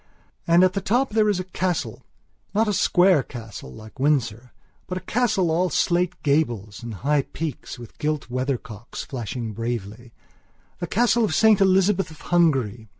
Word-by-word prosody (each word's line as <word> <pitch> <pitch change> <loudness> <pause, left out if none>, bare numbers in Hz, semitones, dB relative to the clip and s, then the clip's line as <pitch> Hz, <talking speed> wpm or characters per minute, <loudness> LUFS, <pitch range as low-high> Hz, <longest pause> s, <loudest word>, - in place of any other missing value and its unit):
And 170 +2 +5
at 185 0 +3
the 195 - -2
top 245 +7 +1
there 215 -1 +3
is 200 -3 +1
a - - -2
castlenot 185 -1 -3 0.5
a 215 0 +2
square 180 -4 +4
castle 110 - -9
like 110 - -13
Windsor, 125 -5 0 0.4
but 185 - -3
a - - -5
castle 195 -4 +1
all 180 +3 +1
slate 180 +1 0
gables 120 -9 0
and 115 -2 -6
high 150 0 +3
peaks 155 0 -6
with 120 -2 -13
gilt 150 -1 -2
weathercocks 125 -3 -4
flashing 120 -3 -5
bravelythe 115 +1 -5 0.8
castle 235 +3 +3
of 215 - 0
St 220 -3 +5
Elizabeth 195 0 +3
of 155 - -14
Hungary. 130 - +1
155 Hz, 150 wpm, -23 LUFS, 120-185 Hz, 0.8 s, And